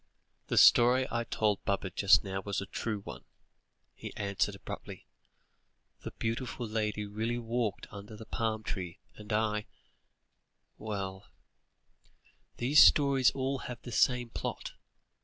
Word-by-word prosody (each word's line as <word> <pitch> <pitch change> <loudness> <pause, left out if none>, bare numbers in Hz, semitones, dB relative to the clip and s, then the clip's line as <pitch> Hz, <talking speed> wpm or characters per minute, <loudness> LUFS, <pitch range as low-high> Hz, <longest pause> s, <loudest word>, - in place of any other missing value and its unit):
"The - - -1
story 125 +2 +6
I 120 0 -1
told 105 -3 0
Baba 100 -1 -1
just 100 +2 +5
now 95 -1 -4
was 100 0 -3
a 100 - -4
true 105 +1 -4
one," - - -9 0.7
he - - -9
answered 100 0 -1
abruptly; 100 - -9 1.0
"the - - -6
beautiful 115 +1 -3
lady 105 -1 -2
really 110 +4 -2
walked 115 -3 -2
under 105 +1 -10
the 110 - -10
palm 110 -1 -2
trees, 95 -4 -4 0.2
and 105 +1 -11
I 105 -1 0 1.1
well 95 -3 -5 1.3
these 135 +5 +5
stories 140 -3 +6
all 135 0 -2
have 120 -1 -6
the 120 - -8
same 125 0 +2
plot. - - -5
110 Hz, 130 wpm, -31 LUFS, 100-120 Hz, 1.3 s, story